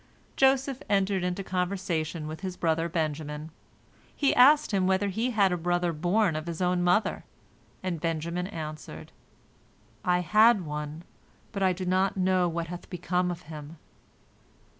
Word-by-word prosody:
Joseph 270 0 +2
entered 195 -2 +1
into 180 +2 -2
conversation 180 -4 -2
with 155 +1 -7
his 185 -2 -5
brother 165 0 0
Benjamin. 155 -1 -3 0.6
He 280 - +2
asked 290 +3 +6
him 190 -2 +2
whether 190 +2 +2
he 225 +6 -1
had 205 -5 +3
a 180 - 0
brother 175 0 0
borne 180 +4 +1
by 155 - -2
his 165 0 -6
own 180 -1 +1
mother, 180 +5 +1 0.6
and 175 -4 -3
Benjamin 170 +2 -2
answered, 155 - -7 0.9
"I 180 0 +2
had 215 +2 +4
one, 150 +2 -5 0.5
but 200 - -4
I 190 -1 +4
do 185 +1 -4
not 185 +2 +1
know 185 -1 +2
what 170 0 -3
hath 175 +1 -8
become 180 0 -1
of 175 0 -5
him." 150 0 -9
180 Hz, 150 wpm, -28 LUFS, 165-190 Hz, 0.9 s, asked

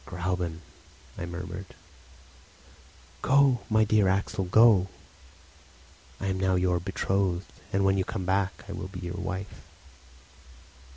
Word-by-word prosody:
"Gräuben!" 90 -2 -3 0.5
I 85 - -5
murmured. 90 +2 -6 1.5
"Go, 135 -2 +4
my 110 0 +4
dear 105 -2 +3
Axel, 95 +1 0
go! 105 -1 +6 1.3
I - - -4
am 95 -1 -1
now 95 0 +2
your 90 -1 +2
betrothed; 95 0 -1 0.3
and 100 0 +1
when 95 0 +3
you - - +2
come 95 0 -4
back 95 +1 0
I - - -7
will - - -5
be 95 -1 -8
your 90 -1 -5
wife." 95 +1 -5
95 Hz, 125 wpm, -28 LUFS, 90-100 Hz, 1.5 s, go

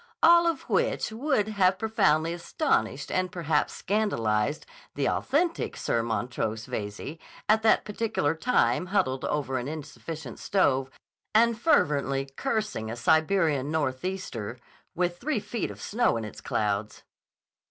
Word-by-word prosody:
All 340 0 +7
of 330 -5 -1
which - - 0
would 225 -2 0
have 190 -3 +3
profoundly 190 -8 +2
astonished 170 - -1
and 185 -1 0
perhaps 160 -4 0
scandalized 145 - 0 0.3
the - - 0
authentic 330 +6 0
Sir 115 - 0
Montrose 115 -1 -2
Veyze, 105 +9 -5 0.3
at 220 +1 +4
that 220 0 +4
particular 210 -8 0
time 165 - +1
huddled 130 -10 0
over 135 -3 -1
an 125 - -5
insufficient 155 -2 -7
stove 135 -9 +2 0.5
and 235 +1 +5
fervently 140 - +2
cursing 215 - -2
a 115 - -4
Siberian 155 +1 +2
northeaster 145 - -3 0.4
with 175 0 -1
three 295 -6 -1
feet 210 +2 -3
of - - -9
snow 230 - +1
in 110 - -4
its 105 - -9
clouds. 105 0 -2
160 Hz, 130 wpm, -27 LUFS, 130-215 Hz, 0.5 s, All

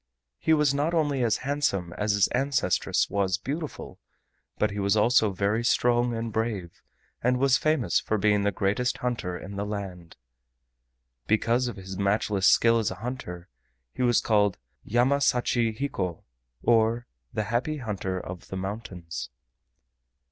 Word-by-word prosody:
He 160 - 0
was 150 -3 +4
not 150 +4 0
only 145 -5 +1
as 115 -2 +2
handsome 135 -12 0
as 105 0 0
his 100 -2 +4
ancestress 125 -9 +1
was 95 -2 0
beautiful, 150 - -6 0.6
but 105 - +1
he 100 - -4
was 100 +1 +2
also 110 -1 +4
very 100 +4 0
strong 120 0 +2
and 115 -1 -4
brave, 105 -6 -3 0.4
and 125 +1 +2
was 135 0 +4
famous 155 -7 +2
for 110 - -1
being 105 0 +3
the 100 0 +1
greatest 100 +6 0
hunter 115 -8 -3
in 100 +2 -8
the 100 - -1
land. 95 -6 -6 1.1
Because 115 +3 +2
of 120 - -5
his 95 0 -8
matchless 100 0 +2
skill 115 0 +5
as 110 - 0
a - - -5
hunter, 105 -7 -6 0.5
he - - -5
was 120 -2 +3
called 105 -3 +2 0.3
"Yama 125 +5 +2
sachi 120 -4 +2
hiko" 95 - -3 0.4
or 115 +1 +3 0.3
"The 110 - -1
Happy 140 +6 0
Hunter 100 -7 -3
of 90 0 -8
the 95 - -5
Mountains." 95 -3 -6
110 Hz, 150 wpm, -27 LUFS, 100-125 Hz, 1.1 s, skill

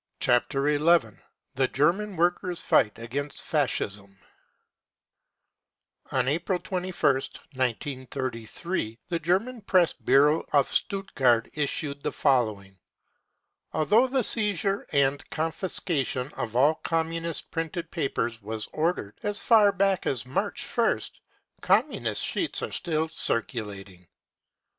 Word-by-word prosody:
Chapter 135 +3 +2
XI: 150 -5 +3 0.4
THE 135 0 +2
GERMAN 185 +10 +1
WORKERS' 175 +1 0
FIGHT 105 -4 +3
AGAINST 135 +5 -4
FASCISM 100 -9 -1 1.9
O - - -1
n 130 -1 +2
April 170 +6 0
2 185 +1 -4
ist, 145 -7 0
1933, 130 +1 -3
the 170 -2 -1
police 195 +9 0
press 180 -4 +4
bureau 150 +3 +3
in 140 - +6
Stutt 195 +6 -2
gart 120 -3 +3
issued 145 -1 -2
the - - -2
following: 110 -8 +1
5 95 - -28 0.6
" - - -45
Although 210 +11 +4
the 260 -1 +1
seizure 200 -3 0
and 140 0 +1
confiscation 155 -5 -1
of 120 -4 -4
all 140 +5 +5
Communist 165 0 -2
printed 165 +1 -4
papers 120 -4 -2
was 110 +1 -4
ordered 155 - -1
as 205 -1 -2
far 215 -3 +6
back 195 -1 +1
as 125 -2 -1
March 130 - -2
ist, - - 0 0.4
Communist - - +1
sheets - - -1
are - - -3
still 160 -1 -1
circulating 105 - -3
145 Hz, 120 wpm, -27 LUFS, 125-175 Hz, 1.9 s, in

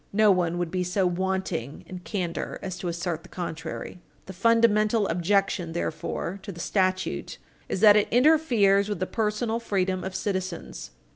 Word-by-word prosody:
No 215 0 +5
one 175 -2 +1
would 175 -2 -2
be 185 -1 0
so 180 +2 0
wanting 180 -7 -2
in 185 - -8
candor 175 -1 -4
a 190 - -4
to 180 0 -5
assert 170 -1 -3
the - - -16
contrary. 175 0 -6 0.2
The 190 - -8
fundamental 215 +1 +3
objection, 180 0 0
therefore, 170 +3 -3
to 200 - -7
the 170 - -11
statute 185 0 -1 0.3
is 190 - -2
that 210 -2 +8
it 210 - +3
interferes 240 -8 +4
with 205 -4 -3
the 185 - 0
personal 220 +2 -1
freedom 190 -4 -1
of 190 0 -5
citizens. 185 -3 -4
190 Hz, 160 wpm, -26 LUFS, 175-210 Hz, 0.3 s, that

